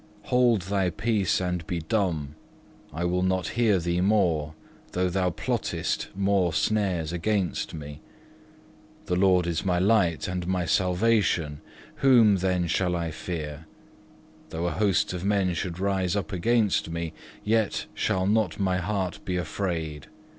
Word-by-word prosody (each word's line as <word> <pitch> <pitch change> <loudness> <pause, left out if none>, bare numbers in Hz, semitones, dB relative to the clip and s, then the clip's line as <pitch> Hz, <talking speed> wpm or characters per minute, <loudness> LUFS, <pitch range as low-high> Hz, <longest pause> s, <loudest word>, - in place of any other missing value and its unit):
Hold 120 -6 +3
thy 95 0 0
peace 105 0 0
and 90 -3 -2
be 90 - -2
dumb; 80 -4 -1 0.6
I 85 +3 -3
will 90 +1 +1
not 95 -1 0
hear 110 -4 +2
thee 85 0 0
more, 85 -7 +1 0.4
though 90 0 +1
thou 90 0 +1
plottest 85 - -2
more 95 -3 +1
snares 90 -4 0
against 95 -1 -1
me. 75 0 -8 1.0
The 90 - 0
Lord 90 -1 +4
is 85 +1 -1
my 90 -2 +1
light 95 -3 +2
and 90 -1 -3
my 90 -1 0
salvation: 90 -5 +1 0.4
whom 115 -7 +5
then 90 -1 0
shall 90 +1 0
I 85 -1 -2
fear? 80 -2 -6 0.8
Though 80 +2 -3
a 90 - 0
host 95 +1 +1
of 90 -1 -5
men 100 -3 +1
should 85 0 -3
rise 95 -1 0
up 100 +1 -2
against 105 -1 +1
me, 85 -1 -4 0.3
yet 110 -1 +1
shall 95 0 0
not 105 -3 +1
my 95 -2 +1
heart 95 0 -2
be 90 -1 -2
afraid. 80 -5 -3
90 Hz, 145 wpm, -26 LUFS, 85-100 Hz, 1.0 s, whom